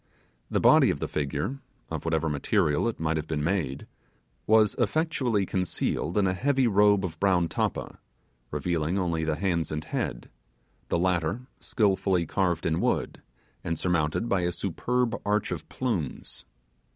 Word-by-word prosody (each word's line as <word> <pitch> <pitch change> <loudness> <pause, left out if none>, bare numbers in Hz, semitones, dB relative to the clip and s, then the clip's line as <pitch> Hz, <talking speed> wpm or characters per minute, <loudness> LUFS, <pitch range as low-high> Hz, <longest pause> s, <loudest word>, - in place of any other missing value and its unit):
The - - +1
body - - +6
of - - 0
the - - -3
figure 75 - -2 0.3
of - - -4
whatever 80 -1 +1
material 75 +4 +1
it 115 - -3
might 80 0 0
have 80 0 -4
been 75 -2 -2
made 75 -6 -1 0.6
was 110 -1 +5
effectually 130 - +1
concealed 90 -1 -1
in 100 - +4
a 95 - +2
heavy 135 +6 +1
robe 105 -2 +4
of 80 -3 -6
brown 90 -4 +3
tappa, - - -3 0.5
revealing; 85 +3 -1
only 85 -4 0
the 80 -1 0
hands 85 -1 -1
and 75 0 -3
head; - - -4 0.6
the - - +1
latter 90 +3 0 0.2
skilfully 95 -5 +1
carved 85 -1 0
in 80 0 +1
wood, - - -1 0.4
and 85 -1 -2
surmounted 85 +3 0
by 100 -5 +1
a 90 0 0
superb 115 +7 -1
arch 105 0 0
of - - -5
plumes. 100 - -3
90 Hz, 150 wpm, -27 LUFS, 80-105 Hz, 0.6 s, body